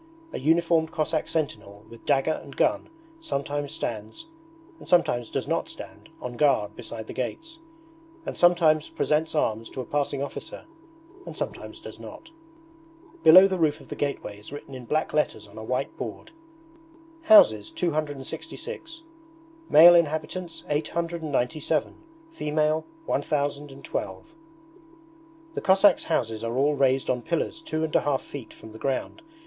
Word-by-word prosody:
A -, -, -3 dB
uniformed 165 Hz, +2 st, +2 dB
Cossack 155 Hz, 0 st, -1 dB
sentinel 105 Hz, -9 st, -4 dB
with 115 Hz, +1 st, -15 dB
dagger 145 Hz, +2 st, +2 dB
and 140 Hz, -, -12 dB
gun 305 Hz, +1 st, +1 dB, 0.3 s
sometimes 145 Hz, -, -3 dB
stands, 110 Hz, -, -5 dB, 0.5 s
and -, -, -13 dB
sometimes 120 Hz, -9 st, +2 dB
does -, -, -3 dB
not -, -, -1 dB
stand, -, -, -11 dB
on 120 Hz, -1 st, -6 dB
guard 140 Hz, -9 st, +2 dB
beside 115 Hz, -2 st, -7 dB
the -, -, -8 dB
gates, 325 Hz, -, -5 dB, 0.7 s
and -, -, -4 dB
sometimes 165 Hz, -3 st, +4 dB
presents 155 Hz, +1 st, 0 dB
arms 115 Hz, -6 st, 0 dB
to -, -, -8 dB
a 130 Hz, -, -3 dB
passing 140 Hz, -1 st, -1 dB
officer 140 Hz, -, -7 dB, 0.6 s
and -, -, -8 dB
sometimes -, -, -5 dB
does -, -, -10 dB
not. 330 Hz, -, -11 dB, 0.9 s
Below 185 Hz, +4 st, +9 dB
the 190 Hz, -2 st, -2 dB
roof 155 Hz, -3 st, +2 dB
of -, -, -16 dB
the -, -, -5 dB
gateway 140 Hz, -8 st, -3 dB
is 105 Hz, -, -12 dB
written 145 Hz, -1 st, -9 dB
in 130 Hz, -2 st, -8 dB
black 155 Hz, +6 st, -1 dB
letters 110 Hz, -8 st, 0 dB
on 100 Hz, -, -17 dB
a -, -, -7 dB
white 125 Hz, -, -2 dB
board: -, -, -7 dB, 0.9 s
'Houses 110 Hz, -, +7 dB
266: 170 Hz, -, -4 dB, 0.7 s
male 170 Hz, +3 st, +9 dB
inhabitants 165 Hz, +1 st, 0 dB
897: 155 Hz, -2 st, -1 dB, 0.4 s
female 155 Hz, -, 0 dB, 0.2 s
1012.' 145 Hz, -, -3 dB, 1.2 s
The -, -, -3 dB
Cossacks' 195 Hz, 0 st, +5 dB
houses 115 Hz, -9 st, -1 dB
are 115 Hz, +2 st, -2 dB
all 145 Hz, +3 st, +3 dB
raised 135 Hz, -1 st, +2 dB
on 125 Hz, -1 st, 0 dB
pillars 170 Hz, -, -2 dB
two 160 Hz, -, -3 dB
and 160 Hz, -, -2 dB
a -, -, +5 dB
half 140 Hz, -2 st, 0 dB
feet 140 Hz, -6 st, -9 dB
from 110 Hz, -, -13 dB
the 110 Hz, -, -11 dB
ground. 135 Hz, -, -2 dB
150 Hz, 145 wpm, -26 LUFS, 130-165 Hz, 1.2 s, Below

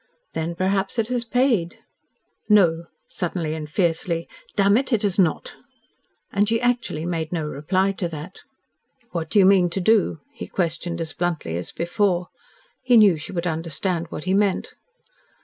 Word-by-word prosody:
"Then 165 Hz, +1 st, -3 dB
perhaps 195 Hz, +4 st, 0 dB
it 225 Hz, 0 st, 0 dB
has 245 Hz, -1 st, 0 dB
paid." 230 Hz, -7 st, +1 dB, 0.7 s
"No," 170 Hz, -5 st, +4 dB, 0.2 s
suddenly 170 Hz, -3 st, -3 dB
and 155 Hz, -1 st, -6 dB
fiercely, 170 Hz, 0 st, 0 dB, 0.3 s
"damn 200 Hz, 0 st, +4 dB
it, 265 Hz, +3 st, +1 dB
it 225 Hz, -4 st, +2 dB
has 200 Hz, -1 st, 0 dB
not!" 175 Hz, -5 st, +1 dB, 0.7 s
And 205 Hz, +1 st, +2 dB
she 225 Hz, 0 st, +2 dB
actually 240 Hz, -10 st, -1 dB
made 165 Hz, -2 st, -2 dB
no 165 Hz, -3 st, -2 dB
reply 185 Hz, +7 st, 0 dB
to 190 Hz, -2 st, -3 dB
that. 165 Hz, +3 st, -8 dB, 0.7 s
"What 165 Hz, -2 st, -3 dB
do -, -, 0 dB
you 195 Hz, -, +7 dB
mean 190 Hz, -2 st, +5 dB
to 180 Hz, -, -2 dB
do?" 195 Hz, -4 st, +2 dB
he -, -, -7 dB
questioned 170 Hz, -1 st, -2 dB
as 160 Hz, -1 st, -4 dB
bluntly 170 Hz, -, -2 dB
as 85 Hz, 0 st, -4 dB
before. 180 Hz, 0 st, 0 dB, 0.5 s
He 250 Hz, -2 st, +4 dB
knew 205 Hz, -5 st, +7 dB
she 150 Hz, -, -8 dB
would 175 Hz, -2 st, -3 dB
understand 165 Hz, +1 st, -2 dB
what 150 Hz, -, -6 dB
he 185 Hz, -, 0 dB
meant. 200 Hz, -1 st, +1 dB
180 Hz, 165 wpm, -23 LUFS, 165-205 Hz, 0.7 s, you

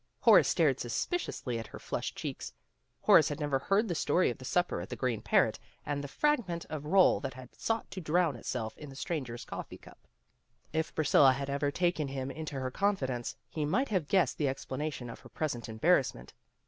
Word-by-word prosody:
Horace -, -, +7 dB
stared -, -, +2 dB
suspiciously 130 Hz, -, -2 dB
at 115 Hz, -, -7 dB
her -, -, -9 dB
flushed -, -, -4 dB
cheeks. -, -, -5 dB, 0.5 s
Horace -, -, +6 dB
had 145 Hz, -, -4 dB
never 145 Hz, -3 st, 0 dB
heard 200 Hz, -, +2 dB
the 175 Hz, -, -1 dB
story 165 Hz, 0 st, +2 dB
of 120 Hz, -, -9 dB
the 130 Hz, -, -9 dB
supper 175 Hz, -, 0 dB
at 90 Hz, -, -8 dB
the -, -, -4 dB
Green 125 Hz, -4 st, -1 dB
Parrot, -, -, +2 dB, 0.3 s
and 145 Hz, -1 st, -2 dB
the -, -, -4 dB
frag 295 Hz, -, +1 dB
ment 170 Hz, -1 st, -4 dB
of 150 Hz, -1 st, -5 dB
roll 190 Hz, +3 st, +5 dB
that 130 Hz, -, -5 dB
had 130 Hz, -1 st, -11 dB
sought 225 Hz, 0 st, -2 dB
to 190 Hz, -, -5 dB
drown 165 Hz, -2 st, +2 dB
itself 115 Hz, -1 st, -4 dB
in 150 Hz, -, -8 dB
the 135 Hz, -, -11 dB
stranger's 135 Hz, -7 st, -4 dB
coffee -, -, -7 dB
cup. -, -, -17 dB, 0.7 s
If 160 Hz, 0 st, -1 dB
Priscilla 145 Hz, -3 st, +5 dB
had 140 Hz, +1 st, -4 dB
ever 140 Hz, +1 st, 0 dB
taken 175 Hz, -1 st, 0 dB
him 135 Hz, 0 st, -4 dB
into 155 Hz, -1 st, -6 dB
her 130 Hz, 0 st, -3 dB
confidence, 130 Hz, -, -1 dB
he 155 Hz, -, -3 dB
might 255 Hz, -, +1 dB
have 185 Hz, -8 st, 0 dB
guessed 180 Hz, -8 st, +2 dB
the 150 Hz, -, +2 dB
explanation 135 Hz, 0 st, -4 dB
of 115 Hz, -, -8 dB
her -, -, -15 dB
present 125 Hz, -8 st, -3 dB
embarrassment. 110 Hz, -, +1 dB
145 Hz, 200 wpm, -31 LUFS, 130-175 Hz, 0.7 s, Horace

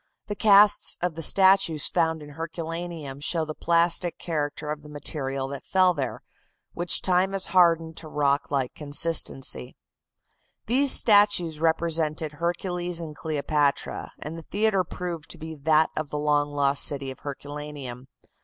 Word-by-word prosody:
The 205 Hz, -, -5 dB
casts 205 Hz, 0 st, +5 dB
of 165 Hz, -2 st, -2 dB
statues 190 Hz, -4 st, +4 dB
found 160 Hz, -2 st, 0 dB
in 145 Hz, -, -11 dB
Herculaneum 165 Hz, -2 st, -6 dB
show 160 Hz, +2 st, 0 dB
the 155 Hz, -, -6 dB
plastic 170 Hz, +2 st, +1 dB
character 150 Hz, -2 st, -4 dB
of 150 Hz, 0 st, -5 dB
the 150 Hz, -, -14 dB
material 135 Hz, -2 st, -2 dB
that 140 Hz, -1 st, -7 dB
fell 185 Hz, -1 st, +3 dB
there, 135 Hz, -6 st, -5 dB, 0.5 s
which 175 Hz, 0 st, +1 dB
time 185 Hz, +1 st, +2 dB
has 195 Hz, -1 st, +1 dB
hardened 165 Hz, -3 st, +3 dB
to 160 Hz, -, -5 dB
rock 145 Hz, -1 st, 0 dB
like 135 Hz, -3 st, -1 dB
consistency. 145 Hz, -, 0 dB, 0.9 s
These 265 Hz, +4 st, +3 dB
statues 205 Hz, -7 st, +4 dB
represented 160 Hz, -1 st, 0 dB
Hercules 175 Hz, +2 st, -3 dB
and 160 Hz, -3 st, -7 dB
Cleopatra, 145 Hz, -2 st, -2 dB
and 150 Hz, +3 st, -7 dB
the 160 Hz, -, -15 dB
theatre 205 Hz, -2 st, +1 dB
proved 175 Hz, -3 st, -7 dB
to -, -, -6 dB
be 160 Hz, 0 st, -8 dB
that 155 Hz, +1 st, +2 dB
of 155 Hz, -2 st, -3 dB
the 150 Hz, -, -4 dB
long 145 Hz, 0 st, +1 dB
lost 140 Hz, -1 st, +1 dB
city 140 Hz, -2 st, 0 dB
of 130 Hz, -, -12 dB
Herculaneum. 145 Hz, -3 st, -8 dB
160 Hz, 145 wpm, -25 LUFS, 145-175 Hz, 0.9 s, casts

